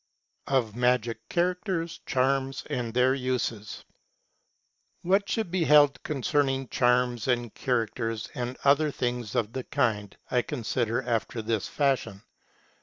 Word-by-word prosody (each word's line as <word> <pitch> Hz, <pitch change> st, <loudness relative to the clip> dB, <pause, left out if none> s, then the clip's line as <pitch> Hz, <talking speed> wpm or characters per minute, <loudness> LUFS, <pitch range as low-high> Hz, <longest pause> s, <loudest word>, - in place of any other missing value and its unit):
II. 135 Hz, -, +4 dB
OF 110 Hz, -4 st, -1 dB
MAGIC 120 Hz, -2 st, 0 dB
CHARACTERS, 175 Hz, -1 st, -1 dB
CHARMS, 135 Hz, +1 st, 0 dB
AND 120 Hz, -2 st, -2 dB
THEIR 125 Hz, +1 st, +4 dB
USES. 125 Hz, -5 st, -3 dB, 1.2 s
What 195 Hz, +3 st, +2 dB
should 220 Hz, -6 st, -1 dB
be 180 Hz, -2 st, +1 dB
held 145 Hz, -3 st, +5 dB
concerning 135 Hz, -2 st, 0 dB
charms, 125 Hz, -2 st, +2 dB
and 120 Hz, -3 st, 0 dB
characters, 115 Hz, -2 st, -2 dB
and 125 Hz, -1 st, -4 dB
other 145 Hz, +2 st, +4 dB
things 120 Hz, -4 st, -3 dB
of 115 Hz, -2 st, 0 dB
the 130 Hz, -, -3 dB
kind, 105 Hz, -5 st, -1 dB
I 125 Hz, -, +3 dB
consider 120 Hz, 0 st, -2 dB
after 115 Hz, -1 st, -2 dB
this 110 Hz, -2 st, -1 dB
fashion. 130 Hz, -8 st, -1 dB
125 Hz, 125 wpm, -27 LUFS, 115-140 Hz, 1.2 s, held